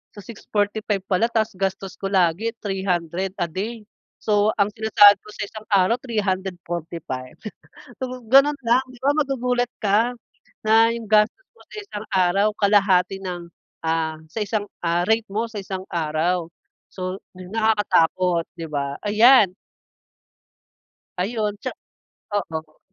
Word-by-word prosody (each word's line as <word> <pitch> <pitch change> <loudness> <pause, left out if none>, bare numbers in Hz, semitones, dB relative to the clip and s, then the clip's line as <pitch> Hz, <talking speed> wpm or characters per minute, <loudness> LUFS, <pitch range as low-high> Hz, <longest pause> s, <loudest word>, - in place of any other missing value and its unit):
Sa 205 - -9
645 205 -1 -2
pala 190 +4 +3
tapos 220 -2 0
gastos 195 0 -3
ko - - -7
lagi 190 +4 +2
300 190 -2 -2
a 175 - +1
day. 215 +7 -4 0.4
So, 210 0 +2
ang 200 - +3
sinasahod 205 -2 +6
ko - - -14
sa - - -4
isang 215 +1 -10
araw 195 +4 +4
345. 175 - -4 0.7
Oh 255 0 -5
,gano'n 275 +4 +5
nga. 235 0 +3
'Di 250 -1 -14
ba 280 - +3
magugulat 250 -4 0
ka 215 +4 +2 0.5
na 225 +1 +5
'yong 230 -2 -6
gastos 215 - +3
mo - - -21
sa - - -9
isang 215 - -8
araw 190 +1 +3
kalahati 195 -2 +3
ng, 175 -2 -5 0.4
ah, 160 -1 0
sa 225 - -5
isang, 205 0 -2 0.2
ah, 170 +1 +1
rate 220 0 +2
mo 220 +3 -1
sa 215 -2 -6
isang 190 0 -5
araw. 165 +1 -1 0.4
So, 185 0 -5 0.2
nakakatakot 185 -4 +1
'di 165 - -4
ba? 140 -1 -3
Ayan. 215 -2 +6 1.6
Ayun 210 +2 -1
tsa - - -3 0.7
oo. 160 -5 -4
200 Hz, 135 wpm, -22 LUFS, 180-220 Hz, 1.6 s, sinasahod